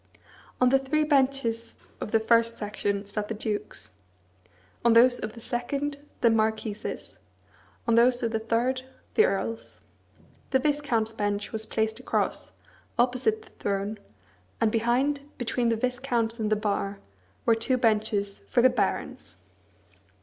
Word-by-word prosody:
On 250 - +5
the 270 +1 +4
three 275 +3 +1
benches 265 -6 +1 0.2
of - - -4
the 225 - +3
first 230 +1 +3
section 205 -1 -2
sat 205 +1 -4
the 220 - -3
dukes; 210 - -4 0.9
on 235 -1 +5
those 245 +2 +6
of 215 0 -4
the 235 - -11
second, 280 +5 -3 0.2
the 235 - +5
marquises; 220 -1 -2 0.7
on 230 - +3
those 245 +2 +4
of 230 - 0
the 220 - 0
third, 235 +3 0 0.3
the 440 - +5
earls. 225 +3 -3 0.7
The 265 - +4
viscounts' 260 -6 0
bench 205 -1 -2
was 220 0 -3
placed 220 +1 -1
across, 255 - -1 0.5
opposite 255 - +2
the - - -19
throne, 200 +1 -2 0.6
and 220 - +3
behind, 245 +6 +1 0.2
between 245 0 0
the 230 - +2
viscounts 240 -1 -1
and 215 -1 0
the - - +5
bar, 200 -1 -1 0.5
were - - +5
two 230 +3 +1
benches 215 -3 +1
for 240 - +3
the 255 - +7
barons. - - -2
230 Hz, 140 wpm, -27 LUFS, 215-255 Hz, 0.9 s, the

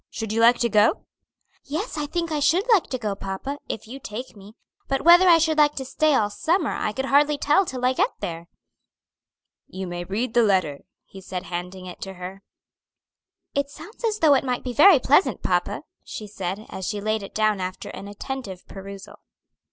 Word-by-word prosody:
Should 220 -2 -5
you 225 - +1
like 235 +1 +6
to 240 - +3
go?" 210 - +3 0.6
"Yes, 335 - -4
I 300 -1 -3
think 335 +1 -3
I 305 - 0
should 335 - +2
like 395 - +4
to 260 - -3
go, 215 -4 -2
papa, 195 +9 -5
if 220 - -5
you 260 +4 -8
take 245 +1 -7
me; 205 +2 -14 0.3
but 270 - -1
whether 350 +3 +7
I 335 - +8
should 315 -1 +1
like 295 0 +4
to 265 - -4
stay 305 +2 +2
all 210 -4 +1
summer 325 - 0
I 215 - -2
could 265 +5 -3
hardly 290 +2 +3
tell 300 +6 +2
till 255 -1 -3
I 255 - +3
get 385 - +2
there." 165 0 -5 1.2
"You 190 0 -6
may 175 0 -5
read 220 +6 -3
the 240 - +5
letter," 185 -10 +1 0.3
he 195 - -12
said, 185 -1 -5
handing 180 +1 -6
it 180 - -10
to 195 0 -6
her. 185 +2 -8 1.1
"It 280 0 -1
sounds 420 +11 -13
as 440 -2 +1
though 315 -7 +5
it 270 - +3
might 250 -2 -2
be 250 - -4
very 335 +5 +8
pleasant, 285 +7 +2
papa," - - 0 0.2
she 215 - -7
said, 195 0 -5
as 190 - -5
she 210 - -2
laid 215 +1 -1
it 195 - -10
down 215 -2 +1
after 185 0 -5
an 200 - -8
attentive 205 -2 -7
perusal. 195 0 -10
235 Hz, 205 wpm, -24 LUFS, 195-290 Hz, 1.2 s, I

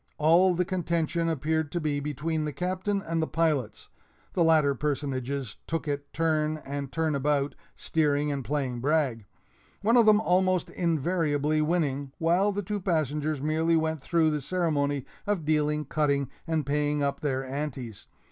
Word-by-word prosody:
All 170 +4 +5
the 180 +1 +1
contention 170 -2 -1
appeared 160 0 -1
to 175 - 0
be 150 -3 -1
between 150 +2 -2
the 150 - -2
Captain 185 +4 -2
and 165 0 -1
the 160 - 0
pilots 155 -7 -1 0.4
(the 175 - +3
latter 155 -3 +4
personages 140 -3 -3
took 165 -1 -2
it 145 -1 -3
turn 155 -1 0
and 140 -1 -4
turn 160 -1 0
about, 140 0 +1 0.2
steering 150 -2 0
and 140 -2 -3
playing 130 -3 -2
brag), 135 -5 0 0.6
one 230 +4 +4
of 230 -2 +5
them 210 -1 +7
almost 185 -3 +1
invariably 155 -3 +1
winning, 145 -4 0
while 175 +5 +2
the 205 +1 -3
two 205 +3 -3
passengers 155 -4 -1
merely 160 +2 +2
went 160 -2 -1
through 160 +1 +2
the 150 -1 -1
ceremony 145 -4 0 0.2
of 200 -7 0
dealing, 150 0 +1
cutting, 140 -2 0 0.2
and 160 -3 0
paying 145 +1 0
up 140 0 -1
their 135 -3 -1
"anties." 130 -5 -5
155 Hz, 155 wpm, -27 LUFS, 145-165 Hz, 0.6 s, them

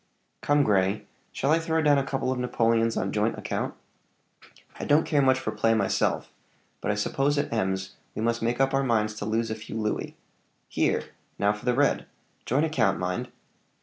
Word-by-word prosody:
"Come, 145 0 +3
Grey; 100 -2 +1 0.3
shall 140 - 0
I 165 - +4
throw 160 0 0
down 145 -2 +5
a - - 0
couple 135 -1 -1
of 130 - -2
napoleons 115 -2 +1
on - - -1
joint - - 0
account? - - -3 1.0
I - - -4
don't 150 +2 +3
care 145 -3 +2
much 130 -1 +4
for 130 - -3
play 115 0 +2
myself; 100 -3 0 0.5
but - - -2
I 105 - +2
suppose 135 +7 0
at 145 - -1
Ems 95 -2 -2 0.2
we - - -3
must 115 0 0
make 120 +2 0
up 135 0 +2
our 135 0 +2
minds 110 -4 +1
to 105 - -4
lose 110 +1 0
a - - -1
few 110 +1 -7
louis. 105 -1 -2 0.5
Here! - - +1 0.3
now 100 0 +2
for 105 +3 -10
the 125 -1 +2
red 145 +1 +2 0.4
joint 145 +6 +2
account, 155 -11 +1
mind!" 90 0 -2
115 Hz, 190 wpm, -27 LUFS, 105-135 Hz, 1.0 s, down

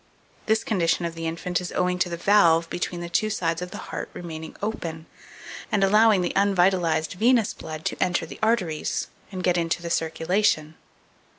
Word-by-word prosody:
This 220 0 +2
condition 175 -4 +1
of 170 - -3
the 165 0 -4
infant 175 +2 -2
is 180 - -5
owing 180 0 0
to 180 - +1
the 170 - -4
valve 170 -4 +4
between 175 0 -3
the 175 - -4
two 215 +5 0
sides 165 -5 -1
of 180 - -4
the - - -8 0.2
heart - - -4
remaining 160 -2 -7
open, 170 -7 -4 0.7
and 200 - +2
allowing 210 0 +5
the 175 - -1
unvitalized 180 -5 +2
venous 230 +3 +3
blood 155 0 -8
to - - -2
enter 175 -2 0
the - - -11
arteries 205 -9 0 0.2
and 185 -2 -5
get 175 -1 +2
into 165 +1 -1
the 170 - -4
circulation. 165 0 +1
175 Hz, 180 wpm, -25 LUFS, 165-200 Hz, 0.7 s, allowing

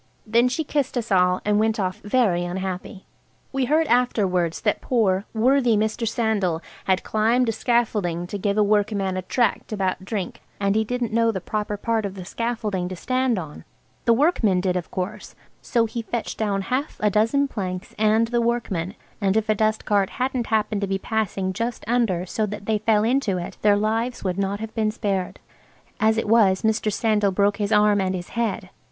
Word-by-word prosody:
Then 235 +3 +3
she 255 +6 -1
kissed 285 -4 -1
us 235 -2 -3
all 180 -1 +3
and 210 0 +2
went 220 +1 +1
off 185 -1 -2
very 205 -6 +2
unhappy. 185 +2 -5 0.5
We 270 -1 +1
heard 310 +5 +3
afterwards 195 - +1
that 210 - 0
poor, 200 -5 +1
worthy 245 0 +3
Mr. 220 +2 -1
Sandal 215 -8 0 0.3
had 190 -1 +1
climbed 230 +3 +2
a - - +3
scaffolding 210 -7 0
to 200 +3 -5
give 200 +1 0
a 210 - +5
workman 205 -2 +1
a 185 - -2
tract 240 +6 0
about 190 -3 -1
drink, 195 -2 -4 0.2
and 200 0 +1
he 220 - +3
didn't 240 0 -3
know 230 0 +3
the 190 - -3
proper 210 +2 -3
part 225 +1 0
of 195 - -9
the 185 -2 -8
scaffolding 210 -5 -2
to 185 - -5
stand 255 +4 0
on 155 -5 -7 0.4
(the 235 - +5
workman 230 - +2
did, 180 0 0
of 180 -2 -3
course) 185 0 -5 0.3
so 235 -2 +1
he 230 +1 -4
fetched 230 0 -4
down 200 -3 0
half 260 +7 -2
a 210 -1 +2
dozen 225 +8 +2
planks 185 -7 -5
and 220 +1 +3
the 240 0 +1
workman, 215 -6 -1 0.3
and 200 +1 +2
if 220 0 -1
a - - +5
dust 215 +1 0
cart 200 -2 +2
hadn't 255 -2 -1
happened 215 -2 0
to 200 - -1
be 195 0 0
passing 195 -2 -2
just 230 +4 -3
under 225 -7 +1
so 215 +3 -1
that 205 0 -7
they 215 -1 +1
fell 215 0 +2
into 235 -5 +1
it 175 - -6
their 205 -1 +4
lives 225 +4 -1
would 185 0 -1
not 200 +1 -1
have 220 0 -6
been 220 -1 +1
spared. 200 -4 -2 0.6
As 220 +1 +3
it 225 - -1
was 205 -4 +4
Mr. 220 -1 +1
Sandal 210 -1 +2
broke 200 +1 +2
his 205 0 -2
arm 210 -1 +4
and 190 0 -1
his 175 -1 -6
head. 220 -5 -2
215 Hz, 195 wpm, -23 LUFS, 190-230 Hz, 0.6 s, a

